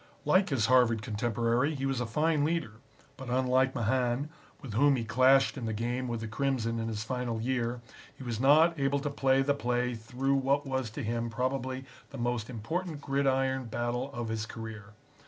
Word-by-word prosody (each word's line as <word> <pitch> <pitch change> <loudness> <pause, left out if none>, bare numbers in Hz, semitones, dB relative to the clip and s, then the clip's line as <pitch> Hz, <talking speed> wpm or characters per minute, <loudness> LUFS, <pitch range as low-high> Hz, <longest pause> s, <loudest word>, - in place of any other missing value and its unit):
Like 185 +6 +4
his 130 -7 +1
Harvard 120 -3 +4
contemporary, 115 +6 0
he 135 -1 -3
was 135 -2 -1
a 120 - -2
fine 150 +5 +1
leader, 160 -6 0 0.5
but 130 -2 -8
unlike 130 +1 +2
Mahan, 125 +4 0 0.3
with 135 -7 -8
whom 140 +5 +4
he 120 - -2
clashed 130 +4 +4
in 115 - -4
the 110 - -2
game 120 +4 -2
with 120 -2 -3
the 110 - -4
Crimson 115 -1 -1
in 115 - -2
his 110 -1 -3
final 125 -1 -3
year, 120 0 -1 0.4
he - - -9
was 120 -3 -3
not 155 +5 +5
able 140 0 +2
to 145 +1 -3
play 135 -1 +2
the 145 +1 +2
play 125 -2 -1
through 125 +4 -2
what 140 +1 +1
was 130 -3 -2
to 105 - -6
him 115 +1 -2
probably 130 +2 -2 0.2
the 140 - -9
most 120 -2 -2
important 155 - -4
gridiron 135 -2 0
battle 120 +3 -2
of 120 -4 -4
his 110 -1 -3
career. 110 -2 -8
125 Hz, 190 wpm, -30 LUFS, 115-135 Hz, 0.5 s, not